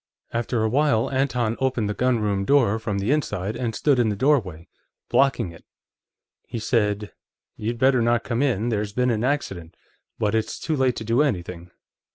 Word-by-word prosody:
After 120 -1 -1
a - - +2
while, 125 -1 +2
Anton 125 -4 0
opened 130 -5 0
the 105 - -1
gunroom 105 -5 0
door 115 -3 +3
from 110 -3 -3
the 100 +6 0
inside, 105 -9 -1
and 120 -2 -3
stood 140 -4 +2
in 115 -2 +3
the 105 - -1
doorway, 100 - 0 0.4
blocking 135 -10 +2
it. 85 - -15 0.8
He - - -5
said: 105 -2 0 0.4
'You'd 115 +3 -3
better 130 0 +3
not 120 0 +2
come 120 0 -1
in. 120 -5 +1
There's 105 -2 -2
been 125 +2 +1
an 110 0 -1
accident, 100 - -2 0.4
but 105 0 0
it's 110 0 -1
too 160 - -1
late 130 -3 +1
to - - -5
do 115 +5 +2
anything. 90 - -2
115 Hz, 180 wpm, -24 LUFS, 105-130 Hz, 0.8 s, door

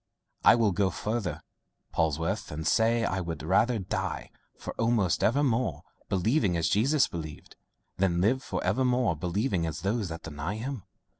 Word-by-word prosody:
I - - +8
will 115 -3 +3
go 95 +1 +1
further, 95 -8 -3 0.5
Polwarth, 80 +6 0
and 80 +1 -5
say, 115 +6 +3
I 95 - -1
would 85 -4 -5
rather 110 +8 +3
die 95 -3 -3 0.3
for - - -6
evermore 115 - +1 0.3
believing 100 - +2
as 80 -1 +1
Jesus 135 +8 +3
believed, 80 -3 -8 0.4
than 90 -2 +1
live 120 +8 +2
for 95 -8 -4
evermore 125 0 +2
believing 90 - -1
as 80 +1 -5
those 100 +1 -1
that 80 0 -7
deny 80 +5 -4
him. 125 +1 -4
95 Hz, 145 wpm, -28 LUFS, 85-115 Hz, 0.5 s, I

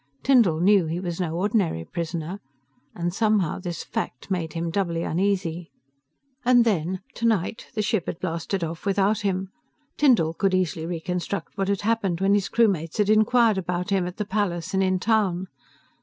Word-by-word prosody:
Tyndall 230 -12 +4
knew 190 -1 +4
he 165 +2 -2
was 175 -1 -4
no 165 -2 -2
ordinary 185 - 0
prisoner, 170 - -4 0.6
and 175 0 -2
somehow, 210 -5 +1
this 175 -3 -5
fact 125 +10 -5
made 165 -4 -2
him 170 0 -2
doubly 170 -3 -1
uneasy. 175 -2 -1 0.7
And 245 -1 +5
then, 185 -3 0
tonight, 225 -3 -1
the 215 - 0
ship 205 -4 0
had - - -4
blasted 170 +1 -2
off 165 +4 -5
without 200 +2 +2
him. 190 -1 -2 0.5
Tyndall 230 - +4
could 190 +2 +1
easily 170 -3 -1
reconstruct 180 +2 -4
what 195 -1 -1
had 200 -1 0
happened 205 -5 0
when 195 +1 +3
his 205 -2 +1
crewmates 190 -9 +1
had 210 0 +3
inquired 220 -1 +4
about 180 +1 -3
him, 190 -3 +1
at 180 - -8
the 210 - -2
palace 185 -3 -2
and 190 - +2
in 185 -1 +2
town. 190 -3 +1
185 Hz, 170 wpm, -24 LUFS, 170-205 Hz, 0.7 s, And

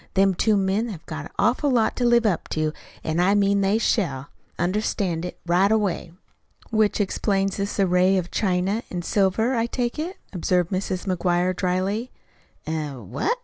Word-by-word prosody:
Them 195 0 +4
two 210 +3 +2
men 195 +4 0
have 170 -7 -8
got 155 -2 -6
an - - -11
awful 245 +8 +2
lot 235 -4 +2
to 245 - +1
live 240 -1 +4
up 195 -6 0
to, 155 -1 -1 0.3
an' 160 +2 -1
I 190 +3 +4
mean 200 0 +3
they 195 +2 +2
shall 145 - 0 0.3
understand 180 -2 -1
it 180 - -7
right 180 +4 +3
away." 205 -6 0 0.6
"Which 215 -1 +2
explains 195 -1 0
this 200 +1 -3
array 185 0 +4
of 175 -1 -3
china 190 +2 0
an' 175 -1 -4
silver, 205 +7 +1
I 230 -1 +1
take 240 +3 -2
it," 345 +5 -4 0.2
observed 180 0 0
Mrs. 185 0 -2
McGuire 180 0 +1
dryly. 190 +6 -1 0.6
"Eh? 155 -2 -3
What?" 125 - -2
195 Hz, 170 wpm, -24 LUFS, 175-215 Hz, 0.6 s, Them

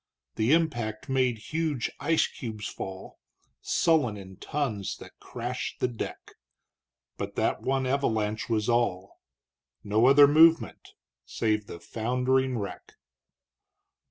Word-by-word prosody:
The 110 +4 +1
impact 120 -9 0
made 130 -3 +1 0.2
huge 155 -6 -1
ice 160 +3 +2
cubes 110 -4 -6
fall 95 0 -8 0.4
Sullen 145 -11 +2
in 95 -1 -11
tons 115 -7 -3
that - - -14
crashed 125 +1 -5
the - - +2
deck; 120 -2 -7 0.8
But - - -5
that - - 0
one 135 0 0
avalanche 110 -6 -1
was 110 -2 0
all 115 -6 0 0.6
No 110 +4 +3
other 140 +1 +8
movement 160 +3 +4 0.3
save 105 - -1
the 85 - -8
foundering 125 +6 0
wreck. 100 -2 -7
120 Hz, 115 wpm, -27 LUFS, 110-135 Hz, 0.8 s, other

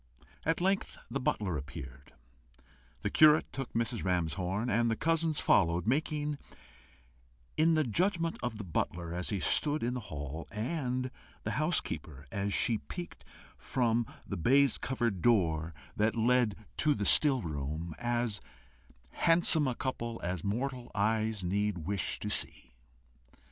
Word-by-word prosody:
At 165 0 +2
length 195 +3 0
the 140 - -1
butler 100 - 0
appeared, 70 -3 -9 0.9
the 100 - -1
curate 155 0 +6
took 135 -3 -4
Mrs. 115 0 -1
Ramshorn, 90 +4 0
and 115 0 +2
the 115 - +1
cousins 165 +2 +1
followed 85 -2 +3
making, 150 +3 0 1.2
in 160 +1 +4
the 155 - +3
judgment 165 - +1
of 120 -3 -3
the 105 - -5
butler 85 -1 -2
as 90 +1 -3
he 100 - -1
stood 150 - +2
in 120 +1 0
the 125 - -2
hall, 75 +2 -5
and 125 +2 -2 0.3
the - - -2
housekeeper 70 -2 -1
as 100 0 -1
she 110 +2 +2
peeped 175 -1 -8 0.4
from 120 -2 +1 0.2
the 100 - -4
baise 135 - +4
covered 120 -8 -1
door 85 -8 +3 0.2
that 110 +2 +2
led 120 -2 +3 0.2
to 150 -2 +3
the 100 - -2
still 135 +2 +4
room, 75 +2 -4
as 120 -3 -1 0.7
handsome 165 -3 +3
a 125 - -1
couple 120 -3 -3
as 90 -1 -2
mortal 125 +4 -2
eyes 110 0 +1
need 100 +2 0
wish 100 0 0
to - - -2
see. 65 - -4
115 Hz, 140 wpm, -32 LUFS, 90-135 Hz, 1.2 s, curate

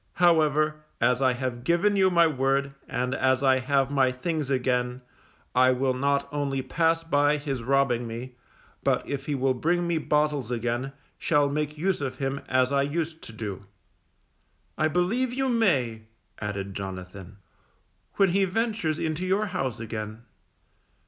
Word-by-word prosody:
However, 155 -3 +3 0.2
as 125 +2 +2
I 130 -1 +4
have 125 -1 -4
given 175 +8 +2
you 190 -1 +4
my 170 -2 +5
word, 135 -2 +1
and 125 +1 -2
as 130 0 +2
I 130 -1 +4
have 135 +1 +1
my 135 -2 +3
things 150 +2 -3
again, 125 -1 0 0.5
I 130 0 +5
will 130 +1 +1
not 140 +2 0
only 140 -2 -1
pass 165 +4 +1
by 145 -2 +2
his 140 -4 -3
robbing 125 -1 +1
me, 120 +3 -7 0.5
but - - +1
if 140 -1 -4
he 145 - 0
will 135 0 +1
bring 175 +7 0
me 170 -2 0
bottles 150 -5 0
again, 120 +3 -2 0.3
shall 145 -3 +2
make 150 +1 -2
use 185 +1 0
of 130 -2 -3
him 135 +1 -2
as 130 0 +2
I 140 0 +3
used 160 +3 -2
to - - -8
do. 105 -3 -6 1.1
I 155 - +2
believe 210 - 0
you 270 0 0
may_, 135 - +1 0.3
added 100 -2 -4
Jonathan, 95 0 -7 0.8
_when 195 -2 +5
he 195 +3 +2
ventures 210 -5 -1
into 160 +2 -2
your 200 +3 +2
house 130 -10 -2
again. 110 0 -6
140 Hz, 155 wpm, -26 LUFS, 125-160 Hz, 1.1 s, my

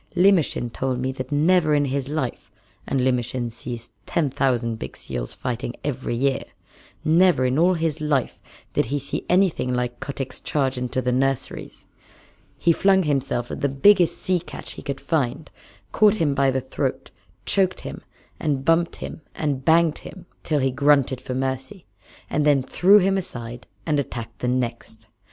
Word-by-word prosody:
Limmershin 175 -10 +3
told 130 -1 -1
me 130 +1 -1
that 130 0 -6
never 155 +1 +3
in 145 -1 +2
his 135 0 -2
life 145 -5 -3 0.4
and 135 - 0
Limmershin 125 -1 0
sees 120 0 -8 0.2
ten 150 -5 0
thousand 120 -4 0
big - - -7
seals - - -5
fighting 120 0 -4
every 135 -4 -2
year 135 +2 +1 0.6
never 165 -3 +4
in 130 +3 +1
all 180 +2 +4
his 160 -2 -1
little 150 -2 +3
life 130 - -5 0.3
did - - +1
he 145 - -1
see 140 0 -4
anything 180 -8 +2
like 125 -1 -2
Kotick's 135 -2 -5
charge 135 -3 0
into 125 +1 -2
the 125 - +1
nurseries. 135 +1 -2 0.7
He 170 - +3
flung 190 +2 +4
himself 130 -5 -1
at - - -5
the 140 - +2
biggest 175 +6 +4
sea 185 -1 0
catch 170 - -8
he - - -8
could 140 -1 -4
find, 145 -3 -1 0.4
caught 215 -1 +5
him 160 -8 +1
by 140 -1 +3
the 130 0 0
throat, - - -3 0.3
choked 190 -2 +1
him - - -7 0.4
and 140 -4 -1
bumped 165 +1 +3
him - - -7
and 140 -4 -2
banged 165 0 +4
him 190 - -11 0.2
till 150 -3 0
he 135 0 +2
grunted 140 -1 +3
for 125 - -5
mercy, 130 +7 -3 0.4
and 150 - 0
then 145 -3 +4
threw 190 +9 +5
him 195 0 +3
aside 120 -8 -7 0.2
and 150 -3 +1
attacked 115 -4 -5
the 125 - -2
next. 115 -3 -3
135 Hz, 170 wpm, -23 LUFS, 125-160 Hz, 0.7 s, caught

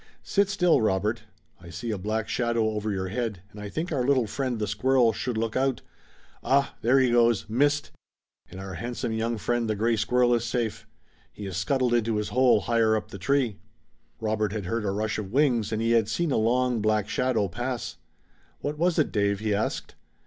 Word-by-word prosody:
Sit 200 -1 +1
still, 180 - +3
Robert! 105 +2 0 0.3
I 85 -1 -12
see 90 +7 -5
a 105 - -2
black 110 +3 -2
shadow 115 -2 0
over 105 0 -3
your 95 -2 -2
head, 110 -4 -3
and 105 -1 -10
I 105 - -6
think 165 - -4
our 135 -5 0
little 130 -2 +3
friend, 125 +2 -2
the 105 - -1
squirrel, 120 +3 +2
should 120 +1 -3
look 115 0 -2
out. 130 -1 0 0.6
Ah, 140 +1 +2
there 125 +4 +4
he 130 -2 +3
goes! 120 -2 +3
Missed! 145 +6 +1 0.6
And 95 - -10
our 95 0 -7
handsome 120 +3 -4
young 115 +1 -1
friend, 120 +1 -1
the 110 - +1
gray 115 +3 +1
squirrel, 120 +3 +2
is 120 -1 +1
safe! 120 -2 -2 0.4
He 105 - -8
has 95 -2 -4
scuttled 125 +5 +1
into 115 -2 +1
his 105 0 -2
hole 125 -4 +4
higher 115 +1 +2
up 110 - -3
the 100 - -8
tree!" 125 -1 0 0.6
Robert 110 -2 -1
had 105 -4 -4
heard 115 +3 -2
a - - 0
rush 105 +2 -2
of 100 -2 -6
wings 125 -5 +2
and 110 0 -1
he 115 - +1
had 115 -2 +3
seen 170 -3 0
a - - +2
long 120 +1 +1
black 105 -1 +1
shadow 120 -4 0
pass. 120 +6 -4 0.6
"What 150 +1 -4
was 175 0 +2
it, 155 - +2
Dave?" 100 -1 +1
he 105 -1 0
asked. 100 - -2
115 Hz, 205 wpm, -26 LUFS, 105-125 Hz, 0.6 s, there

